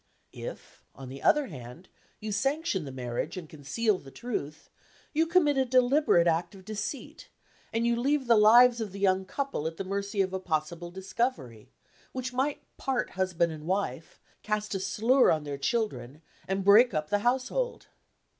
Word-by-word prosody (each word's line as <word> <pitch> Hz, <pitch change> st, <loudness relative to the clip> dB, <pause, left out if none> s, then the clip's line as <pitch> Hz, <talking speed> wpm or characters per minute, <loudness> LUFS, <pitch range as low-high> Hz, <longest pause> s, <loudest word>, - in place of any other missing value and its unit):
"If, -, -, -9 dB
on 130 Hz, -1 st, -9 dB
the 135 Hz, +1 st, -9 dB
other 300 Hz, -2 st, +4 dB
hand, 135 Hz, -, -10 dB, 0.3 s
you 215 Hz, 0 st, -5 dB
sanction 270 Hz, -, 0 dB
the 135 Hz, -, -7 dB
marriage, 125 Hz, +6 st, -4 dB
and 175 Hz, -3 st, -7 dB
conceal 180 Hz, +9 st, -1 dB
the 135 Hz, -, -13 dB
truth, 155 Hz, -, -5 dB, 0.5 s
you 320 Hz, +2 st, +2 dB
commit 315 Hz, -5 st, +3 dB
a -, -, +4 dB
deliberate 255 Hz, -, +4 dB
act 170 Hz, +3 st, 0 dB
of 190 Hz, -1 st, -14 dB
deceit; 215 Hz, +6 st, -6 dB, 0.4 s
and 230 Hz, +1 st, 0 dB
you 235 Hz, 0 st, +2 dB
leave 270 Hz, +3 st, +1 dB
the 235 Hz, -1 st, +5 dB
lives 235 Hz, +3 st, +6 dB
of 205 Hz, -4 st, -5 dB
the 200 Hz, -, -7 dB
young 190 Hz, -1 st, +2 dB
couple 275 Hz, -, -3 dB
at 165 Hz, 0 st, -6 dB
the -, -, -3 dB
mercy 200 Hz, +2 st, -3 dB
of 185 Hz, 0 st, -5 dB
a 190 Hz, -, -1 dB
possible 170 Hz, 0 st, -3 dB
discovery, 175 Hz, -, -3 dB, 0.4 s
which 255 Hz, -1 st, -4 dB
might 275 Hz, +3 st, -1 dB
part 265 Hz, -2 st, -1 dB
husband 180 Hz, -3 st, 0 dB
and 155 Hz, 0 st, -9 dB
wife 190 Hz, -3 st, -3 dB, 0.2 s
cast 210 Hz, -1 st, -2 dB
a 195 Hz, -, -1 dB
slur 225 Hz, +7 st, +3 dB
on 155 Hz, -1 st, +1 dB
their 145 Hz, -1 st, -5 dB
children 145 Hz, -, -2 dB, 0.2 s
and 190 Hz, 0 st, -2 dB
break 210 Hz, +1 st, +6 dB
up 155 Hz, +4 st, -2 dB
the 205 Hz, -, +3 dB
household." 260 Hz, -, -1 dB
200 Hz, 175 wpm, -28 LUFS, 160-245 Hz, 0.5 s, lives